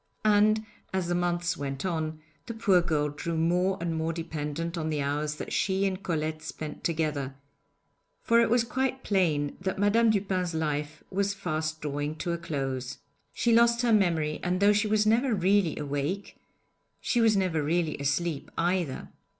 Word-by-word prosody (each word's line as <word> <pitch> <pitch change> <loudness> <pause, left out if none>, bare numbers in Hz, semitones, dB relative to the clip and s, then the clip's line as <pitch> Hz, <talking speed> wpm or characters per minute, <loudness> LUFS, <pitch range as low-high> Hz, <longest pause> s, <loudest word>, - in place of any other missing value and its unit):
And 215 +1 +4 0.3
as 185 -2 -1
the - - +1
months 175 -1 0
went 140 0 -4
on, 160 -3 -2 0.3
the 230 - -5
poor 195 -5 +4
girl 150 -3 0
grew 165 +3 -4
more 180 +4 +2
and 170 -1 -2
more 160 +1 -1
dependent 165 0 -4
on 160 -2 -2
the 150 -1 -1
hours 150 +2 -1
that - - -6
she 190 0 +1
and 190 0 -1
Colette 155 -3 -2
spent 155 -1 -7
together, 150 -5 -1 0.9
for 230 -1 +4
it 230 - +3
was 240 0 +4
quite 260 +2 -2
plain 160 -8 +1
that 190 0 -2
Madame 215 +3 +4
Dupin's 185 -5 0
life 150 -1 -2
was 200 +1 0
fast 155 -4 -3
drawing 145 +1 -3
to 170 +2 -3
a 170 - -2
close. 135 -6 -3 0.3
She 235 - +1
lost 235 +1 +4
her 235 -2 +3
memory, 165 -7 +2
and 180 +1 0
though 200 +1 +5
she 210 +1 +1
was 210 0 +2
never 230 +2 +3
really 190 -2 +2
awake, 145 +7 -3 0.6
she 240 - +1
was 220 -2 +4
never 180 -5 +1
really 160 +1 0
asleep 145 +2 -1
either. 175 -5 -1
170 Hz, 170 wpm, -28 LUFS, 155-200 Hz, 0.9 s, though